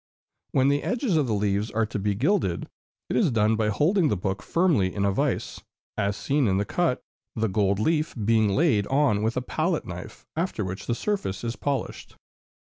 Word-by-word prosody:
When 135 +1 +4
the 145 0 +2
edges 245 -6 0
of 150 -4 +2
the 110 - 0
leaves 100 +1 0
are 110 0 0
to 110 -1 -4
be 100 0 0
gilded, 155 - 0 0.4
it - - -2
is 195 - +3
done 110 -2 +2
by 110 -1 0
holding 160 - +2
the 105 - 0
books 95 +2 -3
firmly 160 - +2
in 100 -1 0
a 100 - +2
vise, - - -1 0.3
as 100 -1 -1
seen 140 -3 +1
in 95 -1 +2
the 100 - 0
cut, 165 +3 0 0.3
the 115 -1 0
gold 100 -1 +1
leaf 155 +8 0
being 110 -1 +2
laid 110 -4 +2
on 135 -7 +2
with 110 +3 -1
a 125 - -1
pallet 160 +5 -1
knife; 90 0 -9
after 160 - -2
which 95 +1 -6
the 120 - 0
surface 190 - -2
is 115 0 -2
polished. 140 -1 -4
115 Hz, 200 wpm, -26 LUFS, 100-150 Hz, 0.4 s, When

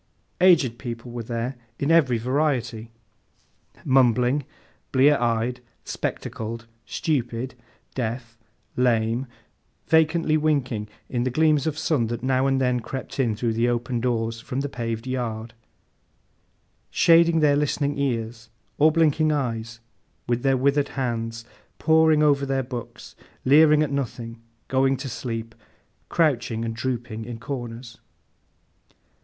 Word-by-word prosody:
Aged 155 -11 +4
people 120 -1 -6
were 120 0 -5
there, 115 +3 -4 0.2
in 140 +3 0
every 140 -8 +4
variety. 125 -3 -1 1.0
Mumbling, 130 +1 +3 0.5
blear 140 +3 +5
eyed, 120 +1 0 0.3
spectacled, 115 +1 -4 0.2
stupid, 125 - -2 0.4
deaf, 120 -1 -4 0.4
lame; 120 0 +1 0.6
vacantly 160 0 +3
winking 135 -8 0 0.2
in 120 - -2
the 130 - 0
gleams 155 +2 +2
of 155 -1 -2
sun 150 -7 +1
that 120 +1 -4
now 130 0 +2
and 135 -1 +2
then 125 -1 +1
crept 135 +4 -7
in 120 -5 +1
through 115 +1 -1
the 115 +2 +1
open 120 0 -1
doors, 115 -2 -1
from 130 +4 -4
the 140 - -3
paved 115 -2 -4
yard; 115 -3 -3 1.4
shading 165 0 +5
their 150 -2 +4
listening 145 0 0
ears, 115 -4 -2 0.3
or 155 +2 +6
blinking 155 -1 +3
eyes, 115 -5 -3 0.5
with 120 0 0
their 135 0 +2
withered 140 +2 +2
hands; 115 -3 -3 0.3
poring 160 -1 +4
over 140 -2 +3
their 135 -1 0
books, 120 -2 -8 0.3
leering 150 +2 +6
at 145 - -2
nothing, 115 -4 -4 0.3
going 135 0 +2
to 135 +2 -6
sleep, 115 -2 -5 0.6
crouching 120 -8 +1
and 115 0 -3
drooping 120 -2 -3
in 120 0 -7
corners. 120 -2 -7
125 Hz, 125 wpm, -24 LUFS, 115-140 Hz, 1.4 s, or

